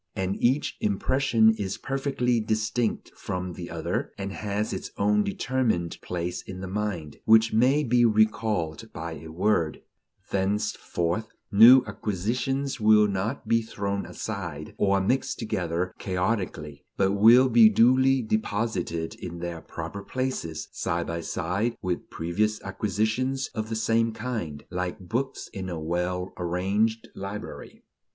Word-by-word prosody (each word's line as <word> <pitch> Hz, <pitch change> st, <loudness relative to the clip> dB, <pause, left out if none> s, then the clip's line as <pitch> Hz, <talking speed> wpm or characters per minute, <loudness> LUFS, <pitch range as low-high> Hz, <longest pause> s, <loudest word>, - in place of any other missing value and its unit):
And 95 Hz, +1 st, -2 dB
each 130 Hz, +5 st, +2 dB
impression 110 Hz, +2 st, +3 dB
is 95 Hz, -2 st, -2 dB
perfectly 135 Hz, -3 st, 0 dB
distinct 110 Hz, +1 st, -1 dB
from 90 Hz, -1 st, -4 dB
the 85 Hz, 0 st, -7 dB
other, -, -, -3 dB
and 100 Hz, 0 st, -4 dB
has 105 Hz, +1 st, -2 dB
its -, -, -5 dB
own 105 Hz, +1 st, +3 dB
determined 110 Hz, -6 st, -1 dB
place 90 Hz, 0 st, -3 dB
in 95 Hz, -1 st, -8 dB
the 95 Hz, -, -5 dB
mind, 95 Hz, -7 st, -3 dB
which 110 Hz, 0 st, +5 dB
may 130 Hz, +7 st, +4 dB
be 120 Hz, -2 st, +3 dB
recalled 110 Hz, -6 st, +1 dB
by 85 Hz, +1 st, -5 dB
a 80 Hz, 0 st, -8 dB
word; 85 Hz, -1 st, 0 dB, 0.5 s
thenceforth, 100 Hz, -1 st, -1 dB, 0.2 s
new 120 Hz, +5 st, +9 dB
acquisitions 125 Hz, +7 st, -2 dB
will 105 Hz, -1 st, +6 dB
not 100 Hz, +6 st, -3 dB
be 115 Hz, 0 st, +3 dB
thrown 100 Hz, -2 st, -3 dB
aside 85 Hz, -8 st, -5 dB
or 100 Hz, -1 st, +3 dB
mixed 125 Hz, +8 st, 0 dB
together 90 Hz, -5 st, -2 dB
chaotically, 90 Hz, -6 st, -2 dB
but 95 Hz, -, +3 dB
will 115 Hz, +6 st, +7 dB
be 115 Hz, -3 st, +7 dB
duly 130 Hz, +4 st, +4 dB
deposited 105 Hz, -6 st, -1 dB
in 85 Hz, -1 st, -7 dB
their 85 Hz, -1 st, -5 dB
proper 85 Hz, +5 st, -6 dB
places, 100 Hz, -10 st, -3 dB
side 85 Hz, 0 st, -2 dB
by 85 Hz, 0 st, -3 dB
side 100 Hz, +8 st, -2 dB
with 90 Hz, -1 st, -3 dB
previous 105 Hz, +6 st, -1 dB
acquisitions 110 Hz, +7 st, -1 dB
of 110 Hz, 0 st, -3 dB
the 115 Hz, -, -2 dB
same 115 Hz, +1 st, +1 dB
kind, 110 Hz, -12 st, -4 dB
like 90 Hz, 0 st, -2 dB
books 120 Hz, +9 st, -3 dB
in 95 Hz, -1 st, -5 dB
a 85 Hz, -2 st, -4 dB
well 90 Hz, +3 st, -2 dB
arranged 95 Hz, +6 st, 0 dB
library. 105 Hz, +3 st, -7 dB
105 Hz, 135 wpm, -26 LUFS, 90-115 Hz, 0.5 s, new